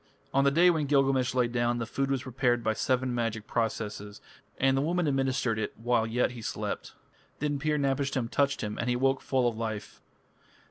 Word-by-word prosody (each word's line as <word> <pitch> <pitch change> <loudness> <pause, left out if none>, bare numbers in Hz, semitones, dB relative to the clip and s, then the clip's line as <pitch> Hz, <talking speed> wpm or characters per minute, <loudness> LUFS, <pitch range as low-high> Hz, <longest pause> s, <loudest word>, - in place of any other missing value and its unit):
On 135 - +4
the 140 - +5
day 170 +5 +5
when 155 -4 -1
Gilgamesh 135 -2 +2
lay 125 -1 +3
down, 120 0 0
the 115 - -2
food 135 +4 -2
was 135 -2 0
prepared 125 -2 0
by 110 - +1
seven 130 +2 0
magic 115 -3 -2
processes, 105 -3 -3 0.4
and 135 0 +3
the 135 - +2
woman 175 +3 0
administered 135 -5 0
it 110 - -4
while 115 0 +1
yet 120 +2 +1
he 120 -2 -9
slept. - - -4 0.4
Then 145 -1 -1
Pir 150 +1 0
napishtim 135 -3 0
touched 140 0 +1
him, 105 -1 -4
and 120 - -1
he 120 - +2
awoke 135 +2 +1
full 130 -2 +1
of 120 - -1
life. 110 -2 -5
130 Hz, 195 wpm, -29 LUFS, 115-135 Hz, 0.4 s, the